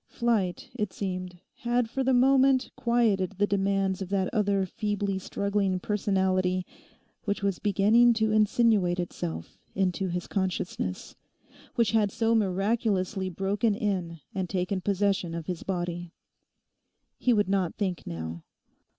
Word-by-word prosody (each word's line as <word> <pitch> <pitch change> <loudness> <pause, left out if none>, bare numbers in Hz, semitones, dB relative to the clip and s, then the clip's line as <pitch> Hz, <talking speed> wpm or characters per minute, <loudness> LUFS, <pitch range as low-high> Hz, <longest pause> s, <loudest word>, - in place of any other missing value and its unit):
Flight, 215 -7 -1
it 210 -6 -2
seemed, 185 -2 -4 0.2
had 240 0 0
for 265 +4 -2
the 265 - +2
moment 265 +1 +4
quietened 215 -6 +1
the 205 - +3
demands 195 -1 0
of 190 - -4
that 195 -2 0
other 200 -2 +2
feebly 205 -1 -2
struggling 200 -1 -1
personality 185 -2 0 0.6
which 200 -1 -2
was 195 -3 0
beginning 210 +4 +4
to 220 -1 +1
insinuate 215 -4 +3
itself 80 - -5 0.2
into 190 0 0
his 175 0 -3
consciousness, 180 - -3 0.6
which 230 -3 +2
had 215 -2 +3
so 225 +2 +1
miraculously 195 -1 0
broken 200 +4 0
in 185 -7 -2
and 190 -3 -2
taken 185 0 -1
possession 195 -3 0
of 165 -2 -5
his 180 -1 -4
body. 175 -2 -3 1.1
He 250 - +2
would 205 -4 +3
not 190 -3 0
think 185 -5 -3
now. 80 0 -5
195 Hz, 135 wpm, -28 LUFS, 185-215 Hz, 1.1 s, moment